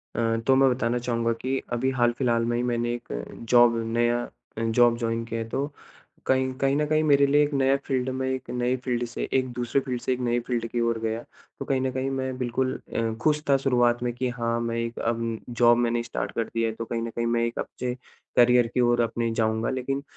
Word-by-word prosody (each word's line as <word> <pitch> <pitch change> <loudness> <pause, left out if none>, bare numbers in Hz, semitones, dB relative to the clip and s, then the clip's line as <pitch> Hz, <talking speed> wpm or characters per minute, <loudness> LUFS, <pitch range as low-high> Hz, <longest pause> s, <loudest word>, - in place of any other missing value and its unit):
अ, 115 -1 +1
तो 135 - +6
मैं 135 0 +5
बताना 125 -1 0
चाहूँगा 115 -1 0
कि 130 +1 -1 0.2
अभी 125 +2 +1
हाल-फिलहाल 120 -1 +1
में 120 0 0
ही 120 - 0
मैंने 120 -1 0
एक 120 0 -7 0.4
जॉब 120 -1 +6 0.2
नया 120 0 +2 0.4
अ, - - -2
जॉब 115 +1 +3
जॉइन 115 -1 -1
किया 115 0 -4
है, 115 - -4
तो 140 +5 -2 0.5
कहीं 130 0 +2
कहीं 135 0 +3
न 150 +1 +1
कहीं 155 +1 +2
मेरे 140 -2 +5
लिए 145 +1 +4
एक 145 - -2
नया 135 0 +3
फील्ड 130 -1 -1
में, 130 0 -2
एक 130 -1 -4
नए 125 +1 0
फील्ड 120 -1 0
से - - -4
एक 130 -1 +2
दूसरे 120 +2 0
फील्ड 125 -2 -4
से 130 - 0
एक 125 - -4
नए 120 0 +1
फील्ड 120 -2 -1
की 120 - 0
ओर 115 -1 0
गया। 115 +1 -2 0.4
तो - - -4
कहीं 135 -1 0
न 130 0 0
कहीं 130 +1 -2
मैं 130 -1 -3
बिल्कुल 130 +1 -1 0.2
अ, 115 -1 0
खुश 150 +3 +2
था 140 - +6
शुरुआत 120 -3 +2
में 120 -1 -1
कि 125 +1 -2
हाँ, 115 -1 -1
मैं 115 0 -2
एक 115 0 -3
अब 115 -1 -1
जॉब 120 0 +4
मैंने 120 -1 +1
स्टार्ट 120 - -4
कर 115 - -1
दी 115 - 0
है 115 - +1
तो 115 +1 -6
कहीं 115 0 -3
न 115 - -3
कहीं 115 +1 -3
मैं 115 0 +1
एक 115 - -4
अच्छे 125 0 -3 0.4
करियर 125 0 +6
की 125 - +2
ओर 120 0 +3
अपने 115 0 -1
जाऊँगा। 110 +1 0
लेकिन 135 +2 -2
120 Hz, 235 wpm, -26 LUFS, 115-130 Hz, 0.5 s, तो